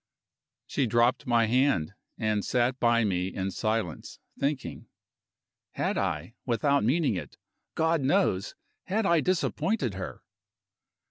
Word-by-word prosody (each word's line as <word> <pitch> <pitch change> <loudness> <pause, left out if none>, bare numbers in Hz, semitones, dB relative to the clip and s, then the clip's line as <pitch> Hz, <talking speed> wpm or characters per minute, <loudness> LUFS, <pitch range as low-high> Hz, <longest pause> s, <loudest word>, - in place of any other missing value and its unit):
She 135 - 0
dropped 120 +5 +2
my 120 -1 +4
hand, 115 - +2 0.2
and 110 -3 0
sat 125 +1 +1
by 115 -1 +3
me 90 -3 0
in 95 0 -3
silence, 110 -3 -2 0.2
thinking. 140 -1 -2 0.9
Had - - -1
I - - -2
without 140 +3 +1
meaning 140 +3 +2
it, 90 - -6 0.4
God 160 -1 +2
knows! 135 - +1 0.3
had 210 +3 0
I 170 -3 +4
disappointed 185 - 0
her? 95 -1 -7
120 Hz, 120 wpm, -28 LUFS, 105-145 Hz, 0.9 s, my